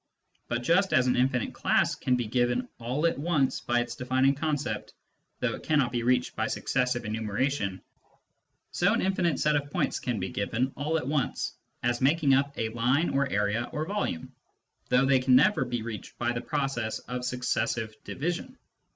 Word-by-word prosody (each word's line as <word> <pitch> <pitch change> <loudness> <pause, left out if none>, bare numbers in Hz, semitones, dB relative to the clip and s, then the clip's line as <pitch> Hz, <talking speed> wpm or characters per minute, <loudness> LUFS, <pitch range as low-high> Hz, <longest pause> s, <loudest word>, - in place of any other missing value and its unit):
But 120 0 -2
just 185 +8 +3
as 130 - +4
an 125 - +2
infinite 125 -2 +1
class - - +2
can 125 - 0
be 120 -1 -1
given 125 - +1
all 125 +7 -1
at 165 - +1
once 150 -4 +1
by 120 0 +1
its 120 - -4
defining 130 +2 +2
concept, 145 0 -3 0.5
though - - +1
it - - -7
cannot 145 -6 +2
be 120 -1 -1
reached 125 +1 +1
by 110 - 0
successive 125 -2 -1
enumeration, 110 -1 -1 0.9
so - - +2
an - - 0
infinite 185 -4 +1
set 150 0 +3
of 145 0 -1
points - - -1
can 120 -4 -2
be 95 0 -3
given 120 +6 -1
all 150 +3 0
at 145 - -4
once 145 -2 -1 0.3
as 120 +1 0
making 140 +1 +4
up 140 +1 +3
a 110 - -1
line 125 +8 +1
or 140 0 +1
area 105 +3 0
or 155 0 -2
volume, 200 - -3 0.6
though 125 +2 +4
they 135 -1 +4
can 130 0 +4
never 170 +11 +4
be 120 -2 -3
reached 115 -2 -7
by 120 0 0
the 120 -1 -3
process 135 -6 -2
of 125 0 -6
successive 120 -3 -1
division. 175 - -4
125 Hz, 180 wpm, -28 LUFS, 120-145 Hz, 0.9 s, as